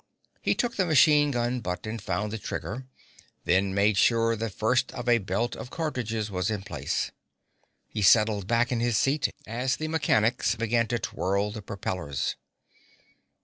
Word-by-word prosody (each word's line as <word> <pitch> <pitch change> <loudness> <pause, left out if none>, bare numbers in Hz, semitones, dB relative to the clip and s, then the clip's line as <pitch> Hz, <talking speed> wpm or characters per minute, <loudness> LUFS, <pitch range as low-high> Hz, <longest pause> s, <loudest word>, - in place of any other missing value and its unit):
He - - +1
took 240 -2 -1
the 190 - +2
machine 150 -1 +5
gun 120 -1 -1
butt 90 -3 -4
and 110 0 -5
found 100 +2 -2
the 110 - -3
trigger, 105 +9 -5 0.6
then 95 +2 +2
made 100 +1 +2
sure 115 +2 +3
the 115 +1 -3
first 125 +6 +1
of 125 -1 -6
a 120 -1 +5
belt 115 +4 -2
of - - -8
cartridges 115 -10 -3
was 90 0 -1
in 105 -3 -3
place. 75 -7 -3 0.8
He 110 - -4
settled 105 0 +4
back 115 +2 +2
in 120 - 0
his 120 -2 +1
seat 140 +2 +2 0.2
as 125 +4 -1
the 155 - -4
mechanics 120 -8 +2
began 115 0 +1
to 120 +1 0
twirl 100 -1 -1
the 110 0 -7
propellers. 90 -7 -3
115 Hz, 165 wpm, -27 LUFS, 100-125 Hz, 0.8 s, machine